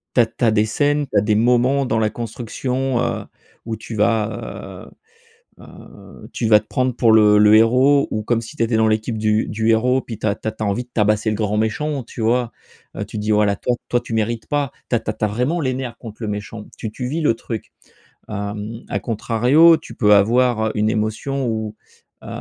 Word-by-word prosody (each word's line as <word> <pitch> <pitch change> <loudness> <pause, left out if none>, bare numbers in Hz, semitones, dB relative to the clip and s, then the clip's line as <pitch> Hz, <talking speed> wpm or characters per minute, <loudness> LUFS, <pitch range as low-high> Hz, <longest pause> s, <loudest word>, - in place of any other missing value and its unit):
tu - - +5
as 115 - +5
tu 115 - -4
as 115 - +5
des 105 0 +3
scènes, 145 +5 0
tu 105 - -4
as - - +5
des 105 +1 +1
moments 125 +5 +2
dans 115 -2 0
la 110 -1 +2
construction 125 +3 -3
heu, 110 -4 -2 0.4
où 115 -1 -3
tu 110 +1 -8
vas, 110 0 -2 0.7
heu, - - -13
heu, - - -14
tu 115 - -1
vas 105 -1 +6
te - - -27
prendre 130 -1 -1
pour 115 -2 +3
le 105 -1 +6
le 105 0 +6
héros 130 +6 +4
ou 110 - -2
comme 115 +1 0
si 115 +7 -10
tu 115 - 0
étais 115 0 +1
dans 110 0 +3
l'équipe 110 +1 -1
du 110 0 +1
du 110 +1 -1
héros 125 +4 +3
puis 115 -4 -8
tu - - -4
as 100 - +1
tu 110 - -8
as 110 0 -4
envie 105 +5 -1
de - - -38
tabasser 105 0 +1
le 105 - -1
grand 105 0 -1
méchant, 135 +6 -1
tu 115 - -9
vois? 120 +1 +1 0.6
Tu - - -7
dis: 105 +1 -1
«Voilà 105 -1 +3
toi 125 - -1
toi 120 - +2
tu 115 - -7
mérites 110 +1 -1
pas», 145 -3 -1 0.2
tu - - +2
as - - +2
tu - - -3
as - - +1
vraiment 125 +11 -1
les 130 -3 0
nerfs 125 -3 -5
contre 115 -1 -11
le 110 - -2
méchant, 105 +1 -6
tu 110 - -5
tu 125 +3 -6
vis 155 +6 -2
le 150 - +3
truc. 115 -1 -7 0.6
Hem, 105 +2 -5
à - - -1
contrario, 125 +8 +4
tu - - -12
peux 105 -2 +5
avoir, 115 +2 +3
heu, - - -1
une 105 0 +1
émotion 110 +5 -2
ou, 110 -2 -3 0.5
heu, - - -11
115 Hz, 225 wpm, -20 LUFS, 110-125 Hz, 0.7 s, vas